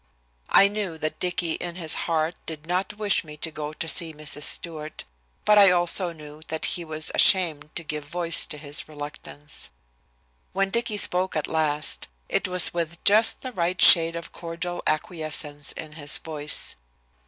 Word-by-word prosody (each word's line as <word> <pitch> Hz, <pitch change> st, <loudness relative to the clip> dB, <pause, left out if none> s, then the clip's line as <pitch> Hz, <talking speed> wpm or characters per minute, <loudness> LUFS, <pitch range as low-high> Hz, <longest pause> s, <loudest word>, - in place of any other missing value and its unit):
I 195 Hz, -, +7 dB
knew 200 Hz, -5 st, -4 dB
that 155 Hz, 0 st, -4 dB
Dicky, 175 Hz, -2 st, -1 dB
in 175 Hz, +1 st, -4 dB
his 165 Hz, -4 st, +3 dB, 0.2 s
heart, 160 Hz, 0 st, 0 dB
did 155 Hz, -1 st, -7 dB
not 185 Hz, +4 st, -2 dB
wish 210 Hz, -2 st, +2 dB
me 150 Hz, -2 st, -11 dB
to 160 Hz, +2 st, -6 dB
go 150 Hz, -1 st, -5 dB
to 160 Hz, +1 st, -6 dB
see 165 Hz, -2 st, +2 dB
Mrs. 150 Hz, -1 st, -2 dB
Stewart, 155 Hz, -2 st, -4 dB, 0.4 s
but 210 Hz, 0 st, +6 dB
I 200 Hz, -1 st, +8 dB
also 175 Hz, 0 st, +2 dB
knew 150 Hz, -1 st, -12 dB
that 160 Hz, 0 st, -3 dB
he 175 Hz, -, 0 dB
was 155 Hz, -1 st, -3 dB
ashamed 160 Hz, -6 st, +4 dB
to 175 Hz, -, -4 dB
give 150 Hz, -1 st, -5 dB
voice 170 Hz, +1 st, +1 dB
to 150 Hz, -, -7 dB
his 145 Hz, 0 st, -6 dB
reluctance. 145 Hz, 0 st, -5 dB, 0.8 s
When 195 Hz, 0 st, 0 dB
Dicky 235 Hz, -2 st, 0 dB
spoke 185 Hz, -2 st, +3 dB
at 155 Hz, -, -1 dB
last, 155 Hz, -2 st, 0 dB, 0.2 s
it -, -, 0 dB
was 180 Hz, -1 st, +3 dB
with 170 Hz, -1 st, -3 dB
just 220 Hz, +2 st, +6 dB
the 255 Hz, -, -5 dB
right 180 Hz, -3 st, -2 dB
shade 165 Hz, -1 st, +7 dB
of 170 Hz, 0 st, -7 dB
cordial 175 Hz, +1 st, -5 dB
acquiescence 155 Hz, -2 st, -3 dB
in 155 Hz, -1 st, -8 dB
his 145 Hz, -2 st, -2 dB
voice. 150 Hz, -2 st, -1 dB
165 Hz, 170 wpm, -24 LUFS, 155-180 Hz, 0.8 s, I